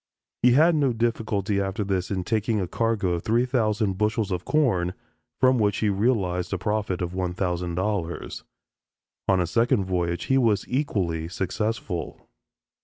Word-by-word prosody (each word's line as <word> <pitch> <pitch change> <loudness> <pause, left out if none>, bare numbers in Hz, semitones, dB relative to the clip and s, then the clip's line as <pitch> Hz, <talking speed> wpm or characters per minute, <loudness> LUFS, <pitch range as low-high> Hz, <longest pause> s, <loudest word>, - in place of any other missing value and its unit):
He 125 0 +5
had 160 +6 +5
no 140 -5 +2
difficulty 110 -3 0
after 95 +2 -2
this 95 -2 -1
in 95 -2 -2
taking 110 +1 0
a 95 - -1
cargo 115 -1 0
of 85 -1 -1
three 115 +5 +2
thousand 110 -6 0
bushels 105 -1 0
of 90 -1 -2
corn, 95 - +1 0.4
from 130 -1 +4
which 105 -2 +2
he 110 - +1
realized 95 -4 0
a - - 0
profit 100 -2 -1
of 85 - -3
$1000. 90 0 -2 0.8
On 95 -1 +3
a 90 - +2
second 110 +2 +2
voyage 85 -2 -1
he 135 0 +2
was 110 -5 +2
equally 95 - -1
successful. 95 0 -3
100 Hz, 150 wpm, -25 LUFS, 90-115 Hz, 0.8 s, He